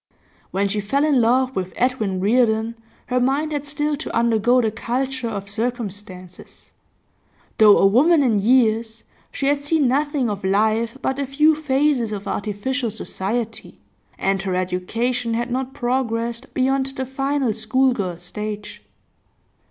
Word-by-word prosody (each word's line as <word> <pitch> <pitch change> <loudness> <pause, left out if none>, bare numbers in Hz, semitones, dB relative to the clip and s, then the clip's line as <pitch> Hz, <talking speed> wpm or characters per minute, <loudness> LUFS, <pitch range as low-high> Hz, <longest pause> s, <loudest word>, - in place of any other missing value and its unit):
When 195 +2 0
she 210 +1 -2
fell 275 +9 +1
in 285 -5 +3
love 255 +3 +2
with 185 -1 -3
Edwin 225 -7 0
Reardon 220 +2 +2 0.3
her 250 0 0
mind 275 +5 0
had 290 -1 -3
still 295 0 -1
to - - -6
undergo 235 +1 +3
the 225 -3 +1
culture 255 +2 -3
of 200 -2 -5
circumstances; 205 -5 -6 0.9
though 210 -2 +8
a - - +4
woman 285 - +5
in 225 -6 +2
years 225 0 +2 0.3
she 275 - -3
had 285 +1 +2
seen 290 -1 +1
nothing 285 0 +1
of 205 -2 -4
life 220 +5 +1
but 265 +1 -1
a 280 - -2
few 300 +4 +4
phases 280 -5 +1
of 205 -1 -5
artificial 230 +5 -2
society, 220 +2 -4 0.4
and 195 -1 0
her 190 -2 -2
education 225 +7 -1
had 240 +2 -2
not 260 +1 -3
progressed 235 -1 -2
beyond 265 +1 +1
the 270 -1 -4
final 270 -2 -1
schoolgirl 220 -5 0
stage. 210 +4 -7
235 Hz, 145 wpm, -21 LUFS, 210-265 Hz, 0.9 s, though